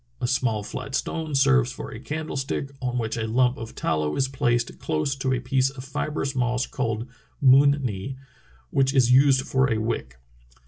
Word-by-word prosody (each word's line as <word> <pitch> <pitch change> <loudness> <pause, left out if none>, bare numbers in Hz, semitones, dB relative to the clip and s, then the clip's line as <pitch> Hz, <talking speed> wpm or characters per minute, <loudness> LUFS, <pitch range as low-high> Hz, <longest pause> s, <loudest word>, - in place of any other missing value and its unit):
A - - -1
small, 120 -4 0
flat 130 +6 -5
stone 160 -3 -2
serves 65 - +4
for - - -7
a - - -8
candlestick, 140 -3 -4
on 125 -1 -2
w^hich 115 -1 -2
a - - -2
lump 125 +2 +2
of 115 0 -8
tallow 75 -1 -1
is 135 - +1
placed 120 -3 -1
close 80 - -1
to 130 -1 -1
a 130 - +1
piece 130 +1 +1
of 135 -2 -9
fibrous 140 0 -3
moss 125 0 0
called 115 -3 -2 0.3
mun 140 +2 +6
ney 110 +2 -3 0.6
which 135 0 +2
is 125 -2 +4
used 135 +1 +6
for 130 -1 +1
a 110 - +1
wick. 110 - -3
130 Hz, 180 wpm, -25 LUFS, 115-135 Hz, 0.6 s, mun